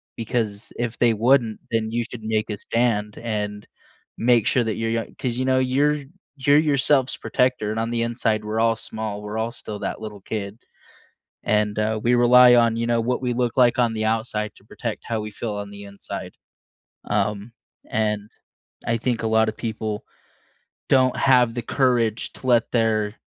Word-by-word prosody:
Because 110 -3 -3
if 120 -1 -3
they 120 -2 +4
wouldn't, 115 0 +2
then 110 -1 0
you 120 +1 0
should 115 -3 -9
make 110 0 -1
a 105 - -3
stand 110 -2 -1
and 105 -2 -4 0.5
make 120 -2 +3
sure 125 - +3
that 110 -2 -2
you're 115 0 -2
young 115 0 -1
'cause, 125 -2 -2
you 130 - 0
know, 130 0 +3
you're 140 +3 +1 0.3
you're 140 +2 +4
yourself's 140 -3 +2
protector, 125 -4 0
and 110 - -2
on 115 - -2
the 120 0 -1
inside, 115 -2 0
we're 110 +1 -2
all 115 0 +3
small 110 -2 -5
we're 105 +1 -5
all 115 +1 -1
still 110 -3 -7
that - - -4
little 105 -2 -8
kid. 105 0 -5 0.9
And, 105 0 +1
uh, 110 +1 0
we 120 +1 +3
rely 125 +1 +7
on, 115 -1 +4
you 115 0 -1
know, 120 -1 +2
what 125 +3 -1
we 125 -1 0
look 120 -1 -1
like 125 -2 +4
on 115 -2 +2
the 110 - -2
outside 110 -1 -1
to - - -20
protect - - -6
how 115 -2 -2
we 105 - -6
feel 105 +2 -5
on 100 0 -5
the 100 0 -10
inside. 100 0 -7 0.7
Um, 105 +2 -1 0.4
and 105 -1 -1 0.6
I 115 0 +2
think 120 0 -1
a - - +1
lot 110 0 +3
of 110 - -7
people 110 -2 -4 0.9
don't 130 -1 +4
have 125 -3 +4
the 120 - -2
courage 120 -4 0
to 130 - -9
let 120 -2 +3
their 110 -2 +1
115 Hz, 190 wpm, -23 LUFS, 105-120 Hz, 0.9 s, rely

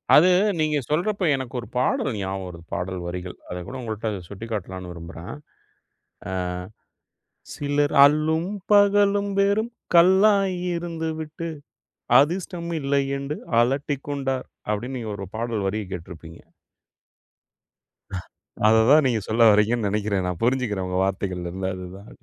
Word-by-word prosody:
அது 180 +5 +7 0.3
நீங்க 155 -1 +2
சொல்றப்ப, 185 +5 0
எனக்கு 130 -2 -6
ஒரு 120 - -8
பாடல் 130 0 +1
ஞாபகம் 95 -1 -3
வருது. 85 -2 -10
பாடல் 90 +1 -3
வரிகள். 90 +1 -6
அத 90 - -4
கூட, 130 - -7
உங்கள்ட்ட 110 -1 -3 0.2
சுட்டிக்காட்டலான்னு 95 -4 -6
விரும்புறேன். 85 0 -8 1.0
ஆ - - -4 1.2
"சிலர் 145 0 0
அல்லும் 155 +4 +2 0.2
பகலும் 205 0 +4
வெறும் 205 +4 +2 0.2
கல்லாய் 190 +1 +5 0.2
இருந்துவிட்டு, 160 -1 -4 0.7
அதிர்ஷ்டம் 170 +2 -1
இல்லையென்று 140 +1 -1 0.2
அலட்டிக்கொண்டார்." 135 0 -1 0.2
அப்பிடின்னு, 120 +5 -2
நீங்க 110 -2 -5
ஒரு 95 -1 -6
பாடல் 115 -4 -2
வரிய 105 +1 -2
கேட்டுருப்பீங்க. 85 -1 -9 2.3
அத 110 +1 +6
தான் 150 -1 +7
நீங்க 115 -4 +1
சொல்ல 115 +1 +5
வர்றீங்கன்னு 105 +1 +3
நினைக்கிறேன். 100 -2 0
நான் 90 -2 -4
புரிஞ்சிக்கிறேன் 115 -7 0
உங்க 90 0 -1
வார்த்தைகள்ல 95 -2 -2
இருந்து 95 0 -3
அதுதான் 95 +3 -9
120 Hz, 115 wpm, -24 LUFS, 95-155 Hz, 2.3 s, அது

